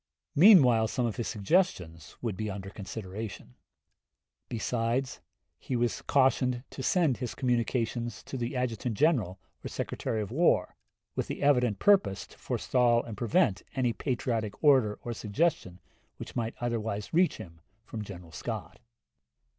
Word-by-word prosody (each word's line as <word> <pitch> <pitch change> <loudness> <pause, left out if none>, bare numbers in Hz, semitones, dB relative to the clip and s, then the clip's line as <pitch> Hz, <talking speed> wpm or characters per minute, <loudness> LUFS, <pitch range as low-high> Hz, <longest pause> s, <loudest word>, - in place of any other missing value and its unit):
Meanwhile 140 - +7
some 125 +2 -1
of 115 - -2
his 120 - -2
suggestions 95 - 0
would 115 -5 -2
be 110 +3 -3
under 95 0 -6
consideration; 100 - -7 1.0
besides, 120 +3 -1 0.4
he 130 - -4
was 120 0 0
cautioned 130 -2 +2
to - - -7
send 155 -2 +2
his 125 -3 -5
communications 120 -2 -1
to - - -8
the 120 +1 -3
Adjutant 120 -3 -2
General 125 - +2 0.3
or - - -4
Secretary 110 - -3
of 105 0 -4
War, 170 +7 +2 0.4
with - - -2
the - - -5
evident 125 -7 +3
purpose 195 - +3
to - - -19
forestall 120 -2 +2
and 115 - -7
prevent 120 - +2
any 125 -3 +1
patriotic 115 -5 -2
order 130 -8 +4
or 120 - -3
suggestion 105 - -1 0.4
which - - -9
might 115 -1 -2
otherwise 110 -4 -3
reach 175 +2 +3
him 85 -2 -11 0.2
from 110 -2 -6
General 90 -4 -10
Scott. - - -6
120 Hz, 140 wpm, -29 LUFS, 105-130 Hz, 1.0 s, Meanwhile